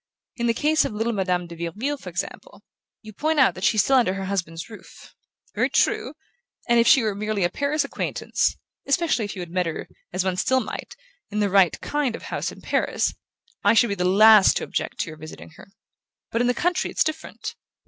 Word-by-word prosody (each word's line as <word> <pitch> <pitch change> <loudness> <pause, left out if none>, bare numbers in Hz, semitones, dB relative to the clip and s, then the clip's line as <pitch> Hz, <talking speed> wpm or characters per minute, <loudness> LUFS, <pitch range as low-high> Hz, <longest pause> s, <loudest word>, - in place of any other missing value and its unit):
In 235 -1 -1
the 230 - +1
case 305 +4 +2
of - - -3
little 225 +2 -1
Madame 180 -3 0
de 170 0 -10
Vireville, 205 - -3
for 185 - -8
instance: 180 +2 -4 0.6
you 215 0 -11
point 310 +7 0
out 265 - +5
that 185 - -9
she's 215 -1 +4
still 270 - +3
under 210 -7 +2
her 195 0 -4
husband's 170 -4 -3
roof. 220 -2 -14 0.4
Very - - +1
true; - - +1 0.5
and 235 -1 +4
if 235 - +3
she 270 -6 +6
were 215 -2 0
merely 210 -1 -2
a 175 - +1
Paris 290 +1 0
acquaintance 280 - -1 0.3
especially 280 -5 +1
if 205 - -6
you 185 - -5
had 170 - -11
met 180 -1 0
her, 165 - -5 0.2
as 185 +1 -1
one 185 -1 -1
still 260 +7 +2
might, 240 - -6 0.3
in 210 0 -3
the 205 -2 +1
RIGHT 190 -3 +4
KIND 290 -5 -1
of - - -10
house - - -3
in - - -13
Paris - - 0 0.5
I 205 +3 +4
should 235 0 +4
be - - 0
the 180 -2 -2
last 205 +2 +6
to - - -3
object - - -3
to - - -3
your 155 - -11
visiting 155 +1 -10
her. 160 - -15 0.6
But 230 - 0
in 245 - +2
the 245 - +1
country 355 +5 0
it's - - +2
different. 315 0 -5
215 Hz, 220 wpm, -24 LUFS, 185-255 Hz, 0.6 s, she